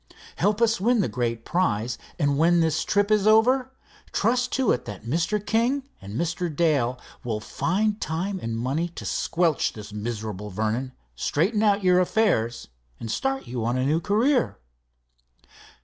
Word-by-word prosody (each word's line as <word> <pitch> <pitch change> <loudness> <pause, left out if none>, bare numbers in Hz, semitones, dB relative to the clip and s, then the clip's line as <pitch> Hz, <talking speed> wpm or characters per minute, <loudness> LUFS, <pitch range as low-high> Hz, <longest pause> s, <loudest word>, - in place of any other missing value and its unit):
Help 205 +5 +2
us 225 -3 +2
win 240 +3 +3
the - - +1
great 115 -2 -2
prize, 125 - 0 0.2
and 145 -4 +1
when 170 +2 +4
this 160 -1 +1
trip 205 0 +1
is 210 -1 +3
over 250 +4 +4 0.4
trust 245 +3 +1
to 265 -2 +2
it 125 - -1
that 105 -1 -8
Mr. 170 - 0
King 240 +6 +1 0.2
and 100 +2 -8
Mr. 170 +1 -1
Dale 145 -6 +1 0.3
will 110 -3 -2
find 205 - -1
time 180 +5 -2
and 115 0 -3
money 140 +9 -1
to 170 - -9
squelch 165 -3 0
this 105 -1 -10
miserable 105 -2 -5
Vernon, 110 +6 -2 0.2
straighten 190 - 0
out 205 -2 +3
your 180 -1 +5
affairs, 180 - +1 0.3
and 115 - -5
start 270 - -1
you 120 -1 -4
on 120 +2 0
a 130 - 0
new 155 +4 +2
career." 235 - +1
170 Hz, 160 wpm, -25 LUFS, -, 0.4 s, your